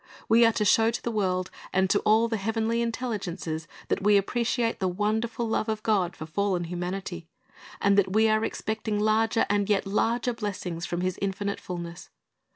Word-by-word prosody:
We 230 Hz, +1 st, +6 dB
are -, -, +4 dB
to 210 Hz, -, 0 dB
show 225 Hz, +3 st, +5 dB
to 235 Hz, -, -4 dB
the 235 Hz, -, -1 dB
world 185 Hz, -4 st, -1 dB, 0.2 s
and 190 Hz, 0 st, +2 dB
to 205 Hz, -, +4 dB
all 220 Hz, +2 st, +3 dB
the 225 Hz, -1 st, -1 dB
heavenly 225 Hz, +3 st, 0 dB
intelligences 195 Hz, -9 st, -3 dB, 0.2 s
that -, -, 0 dB
we 205 Hz, +1 st, +5 dB
appreciate 235 Hz, +3 st, 0 dB
the 190 Hz, -, +1 dB
wonderful 220 Hz, +5 st, -1 dB
love 220 Hz, 0 st, 0 dB
of 215 Hz, -1 st, -2 dB
God 190 Hz, -5 st, +1 dB
for 155 Hz, -, -7 dB
fallen 185 Hz, +2 st, 0 dB
humanity, 175 Hz, 0 st, -5 dB, 0.5 s
and 200 Hz, -1 st, +3 dB
that 190 Hz, -1 st, +1 dB
we 220 Hz, +2 st, +4 dB
are 215 Hz, 0 st, +2 dB
expecting 220 Hz, -1 st, -2 dB
larger 220 Hz, +1 st, +2 dB
and 205 Hz, 0 st, +1 dB
yet 205 Hz, -1 st, +2 dB
larger 235 Hz, +5 st, 0 dB
blessings 190 Hz, -6 st, -4 dB
from 175 Hz, 0 st, -2 dB
His 185 Hz, 0 st, -2 dB
infinite 200 Hz, +1 st, -2 dB
fulness. 175 Hz, -1 st, -7 dB
205 Hz, 180 wpm, -27 LUFS, 185-225 Hz, 0.5 s, We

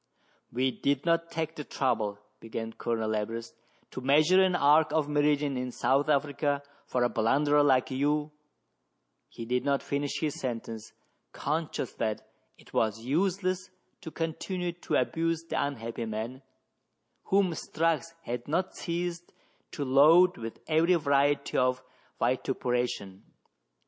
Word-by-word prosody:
" -, -, -38 dB
We 130 Hz, +2 st, +1 dB
did 140 Hz, +2 st, -1 dB
not 165 Hz, 0 st, +2 dB
take 160 Hz, 0 st, -3 dB
the 150 Hz, -, -5 dB
trouble," 105 Hz, -8 st, -1 dB, 0.2 s
began 115 Hz, 0 st, -6 dB
Colonel 110 Hz, -2 st, -2 dB
Everest, 115 Hz, +2 st, -4 dB, 0.4 s
"to 130 Hz, -, -6 dB
measure 155 Hz, +8 st, +5 dB
an 185 Hz, -1 st, +3 dB
arc 150 Hz, 0 st, +4 dB
of 155 Hz, -2 st, +1 dB
meridian 145 Hz, -2 st, +1 dB
in 125 Hz, 0 st, -3 dB
South 140 Hz, +4 st, +1 dB
Africa 145 Hz, 0 st, +1 dB, 0.2 s
for 125 Hz, -, 0 dB
a -, -, +4 dB
blunderer 145 Hz, +7 st, +3 dB
like 135 Hz, -2 st, +3 dB
you 150 Hz, +3 st, 0 dB, 0.3 s
— -, -, -49 dB
" -, -, -50 dB
He 115 Hz, -, -6 dB
did 125 Hz, +2 st, 0 dB
not 140 Hz, -1 st, +1 dB
finish 145 Hz, 0 st, -2 dB
his 155 Hz, -3 st, -2 dB
sentence, 115 Hz, -3 st, -5 dB, 0.4 s
conscious 155 Hz, -3 st, -2 dB
that 110 Hz, -2 st, -3 dB, 0.3 s
it -, -, -19 dB
was 110 Hz, 0 st, +1 dB
useless 185 Hz, +5 st, 0 dB, 0.3 s
to -, -, -7 dB
continue 175 Hz, +3 st, -3 dB
to 170 Hz, -, -3 dB
abuse 165 Hz, +6 st, 0 dB
the 165 Hz, -, -1 dB
unhappy 115 Hz, -4 st, -4 dB
man, 110 Hz, +4 st, -5 dB, 0.8 s
whom 195 Hz, -2 st, +3 dB
Strux 165 Hz, 0 st, -1 dB, 0.2 s
had 120 Hz, 0 st, -5 dB
not 180 Hz, +5 st, -1 dB
ceased 175 Hz, 0 st, -4 dB, 0.4 s
to 145 Hz, -, -4 dB
load 160 Hz, +7 st, +6 dB
with 115 Hz, -1 st, -8 dB
every 165 Hz, +3 st, +4 dB
variety 140 Hz, -2 st, +2 dB
of 130 Hz, 0 st, +1 dB, 0.4 s
vitupera 125 Hz, 0 st, 0 dB
tion. 95 Hz, -1 st, -8 dB
140 Hz, 145 wpm, -29 LUFS, 125-160 Hz, 0.8 s, load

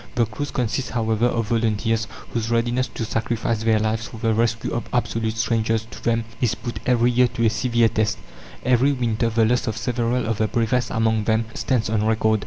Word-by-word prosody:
The 120 Hz, -, +3 dB
crews 115 Hz, +7 st, -5 dB
consist, 125 Hz, +1 st, -2 dB
however, 115 Hz, 0 st, +1 dB
of 115 Hz, -3 st, -1 dB
volunteers, 115 Hz, 0 st, 0 dB, 0.3 s
whose 115 Hz, -1 st, -1 dB
readiness 120 Hz, +2 st, +1 dB
to 115 Hz, -, -5 dB
sacrifice 115 Hz, 0 st, -1 dB
their 110 Hz, -1 st, +3 dB
lives 110 Hz, +1 st, -1 dB
for -, -, -10 dB
the 115 Hz, 0 st, +1 dB
rescue 115 Hz, 0 st, 0 dB
of 120 Hz, -, -3 dB
absolute 115 Hz, -2 st, -1 dB
strangers 115 Hz, -1 st, 0 dB
to -, -, -11 dB
them 115 Hz, -1 st, +1 dB, 0.2 s
is 120 Hz, -4 st, +2 dB
put 120 Hz, -, -6 dB
every 120 Hz, -1 st, +3 dB
year 125 Hz, +1 st, +4 dB
to 115 Hz, -1 st, -1 dB
a 110 Hz, -, +4 dB
severe 120 Hz, -1 st, +2 dB
test; 110 Hz, -1 st, 0 dB, 0.5 s
every 130 Hz, +3 st, +4 dB
winter 115 Hz, -3 st, 0 dB
the 115 Hz, 0 st, +2 dB
loss 125 Hz, +3 st, +1 dB
of 110 Hz, -1 st, -2 dB
several 120 Hz, +1 st, 0 dB
of 115 Hz, -2 st, -2 dB
the 110 Hz, -, +2 dB
bravest 115 Hz, +1 st, 0 dB
among 110 Hz, -1 st, +1 dB
them 110 Hz, +1 st, +2 dB
stands 125 Hz, -5 st, 0 dB
on 105 Hz, 0 st, 0 dB
record. 110 Hz, 0 st, +2 dB
115 Hz, 200 wpm, -22 LUFS, 110-120 Hz, 0.5 s, year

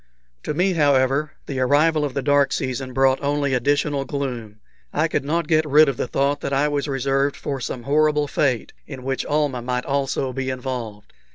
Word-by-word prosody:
To 150 Hz, -, -4 dB
me, 185 Hz, +3 st, +2 dB
however, 145 Hz, -1 st, +2 dB
the 135 Hz, -2 st, -4 dB
arrival 150 Hz, +4 st, +3 dB
of 145 Hz, -3 st, -3 dB
the 140 Hz, -, -1 dB
dark 145 Hz, 0 st, +3 dB
season 130 Hz, 0 st, -3 dB
brought 135 Hz, +1 st, +2 dB
only 140 Hz, -1 st, 0 dB
additional 145 Hz, +2 st, +1 dB
gloom. 125 Hz, -7 st, -5 dB, 0.3 s
I 155 Hz, +2 st, +1 dB
could 150 Hz, -, -1 dB
not 160 Hz, +3 st, -1 dB
get 155 Hz, 0 st, +3 dB
rid 150 Hz, +1 st, +5 dB
of 135 Hz, -3 st, -1 dB
the -, -, -2 dB
thought 140 Hz, +3 st, 0 dB
that 140 Hz, -, -3 dB
I 140 Hz, +2 st, +2 dB
was 145 Hz, 0 st, -1 dB
reserved 135 Hz, +1 st, 0 dB
for 140 Hz, -2 st, -4 dB
some 120 Hz, 0 st, -5 dB
horrible 150 Hz, +2 st, +2 dB
fate, 130 Hz, -5 st, 0 dB
in 135 Hz, -3 st, -8 dB
which 135 Hz, 0 st, -2 dB
Almah 145 Hz, -4 st, 0 dB
might 125 Hz, +1 st, -2 dB
also 135 Hz, -1 st, -1 dB
be 130 Hz, +1 st, -3 dB
involved. 125 Hz, -5 st, -5 dB
140 Hz, 190 wpm, -22 LUFS, 130-145 Hz, 0.3 s, rid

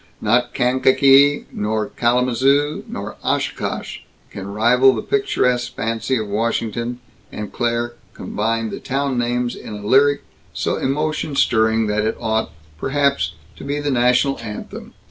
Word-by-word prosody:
Not 120 Hz, 0 st, +1 dB
Kankakee 135 Hz, +3 st, +4 dB
nor 105 Hz, 0 st, -2 dB
Kalamazoo 130 Hz, +5 st, +1 dB
nor -, -, -6 dB
Oshkosh -, -, -2 dB, 0.3 s
can 100 Hz, -1 st, -7 dB
rival 125 Hz, +5 st, +4 dB
the -, -, -4 dB
picturesque 125 Hz, -, 0 dB
fancy 115 Hz, +4 st, -1 dB
of 110 Hz, -2 st, -3 dB
Washington, 115 Hz, +3 st, -2 dB, 0.3 s
and 105 Hz, -1 st, -6 dB
Claire 120 Hz, 0 st, -1 dB, 0.2 s
combined 115 Hz, +1 st, -2 dB
the -, -, -5 dB
town 135 Hz, -1 st, -1 dB
names 120 Hz, 0 st, -1 dB
in 105 Hz, -, -8 dB
a 105 Hz, 0 st, -8 dB
lyric 140 Hz, +5 st, +4 dB, 0.3 s
so -, -, -1 dB
emotion 150 Hz, +1 st, -1 dB
stirring 110 Hz, -3 st, +3 dB
that 105 Hz, 0 st, 0 dB
it 110 Hz, +1 st, -1 dB
ought, 110 Hz, -4 st, -1 dB, 0.3 s
perhaps, 140 Hz, -, 0 dB, 0.2 s
to -, -, -10 dB
be 145 Hz, +1 st, -2 dB
the 145 Hz, -1 st, -1 dB
national 125 Hz, +2 st, +2 dB
anthem. 105 Hz, -3 st, -8 dB
120 Hz, 135 wpm, -20 LUFS, 110-135 Hz, 0.3 s, Kankakee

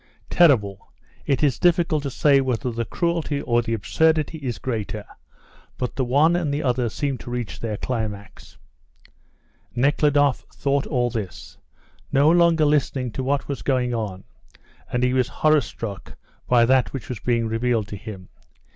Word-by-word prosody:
"Terrible! 110 Hz, -, +3 dB, 0.4 s
It 140 Hz, +2 st, +1 dB
is 140 Hz, -5 st, +2 dB
difficult 170 Hz, -3 st, +2 dB
to 140 Hz, -, -3 dB
say 140 Hz, +1 st, +3 dB
whether 125 Hz, -1 st, -1 dB
the 115 Hz, 0 st, -3 dB
cruelty 165 Hz, 0 st, -1 dB
or 120 Hz, -3 st, +1 dB
the 115 Hz, -1 st, -2 dB
absurdity 160 Hz, +8 st, +1 dB
is 125 Hz, -7 st, -4 dB
greater, 110 Hz, -2 st, -4 dB, 0.7 s
but 125 Hz, -, -3 dB
the 130 Hz, -, 0 dB
one 145 Hz, +7 st, +3 dB
and 170 Hz, -5 st, -1 dB
the 145 Hz, +2 st, -2 dB
other 125 Hz, -2 st, 0 dB
seem 140 Hz, +1 st, -3 dB
to -, -, -9 dB
reach 120 Hz, -5 st, -4 dB
their 110 Hz, -3 st, -3 dB
climax." 105 Hz, -5 st, -5 dB, 1.2 s
Nekhludoff 145 Hz, +1 st, +3 dB, 0.2 s
thought 140 Hz, 0 st, 0 dB
all 125 Hz, -4 st, 0 dB
this, 105 Hz, -7 st, -6 dB, 0.5 s
no 145 Hz, +3 st, +4 dB
longer 170 Hz, -2 st, +4 dB
listening 140 Hz, -4 st, 0 dB
to 130 Hz, -, -4 dB
what 140 Hz, +1 st, -1 dB
was 140 Hz, -3 st, -4 dB
going 125 Hz, -3 st, 0 dB
on, 105 Hz, -5 st, -4 dB, 0.7 s
and 125 Hz, 0 st, 0 dB
he 125 Hz, 0 st, +2 dB
was 130 Hz, -2 st, +2 dB
horror 155 Hz, +1 st, +3 dB
struck 105 Hz, -5 st, -7 dB, 0.3 s
by 120 Hz, -2 st, +5 dB
that 130 Hz, +1 st, +2 dB
which 135 Hz, -6 st, -6 dB
was 125 Hz, -4 st, -5 dB
being 115 Hz, +1 st, 0 dB
revealed 115 Hz, -1 st, 0 dB
to 105 Hz, -, -5 dB
him. 100 Hz, -3 st, -9 dB
125 Hz, 160 wpm, -23 LUFS, 115-145 Hz, 1.2 s, by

